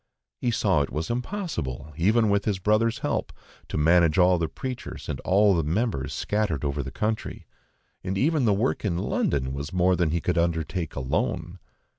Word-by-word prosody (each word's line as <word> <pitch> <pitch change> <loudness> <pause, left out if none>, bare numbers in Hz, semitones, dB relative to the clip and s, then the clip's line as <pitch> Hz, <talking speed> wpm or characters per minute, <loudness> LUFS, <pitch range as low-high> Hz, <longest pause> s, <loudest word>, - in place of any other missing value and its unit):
He 125 - 0
saw 100 -8 +2
it 70 - -1
was 80 +7 -3
impossible, 120 - -4
even 105 +6 +3
with 100 0 +1
his 105 -3 0
brother's 110 +4 +2
help, - - -1 0.4
to - - -4
manage 85 +1 +4
all 90 -1 +5
the 80 - 0
preachers 125 - -6
and - - -3
all 100 +2 +4
the 85 - +2
members 80 - -1
scattered 80 0 -1
over 70 0 -1
the 65 - -5
country, 110 +10 -3 0.6
when 95 +1 -3
even 150 +2 +2
the 110 - +4
work 110 +7 0
in 90 -6 0
London 65 -6 0
was 70 +3 -5
more 90 0 +3
than 85 -3 +1
he 85 +2 0
could 90 +1 0
undertake 85 0 -1
alone. 65 -1 -2
90 Hz, 180 wpm, -26 LUFS, 75-110 Hz, 0.6 s, all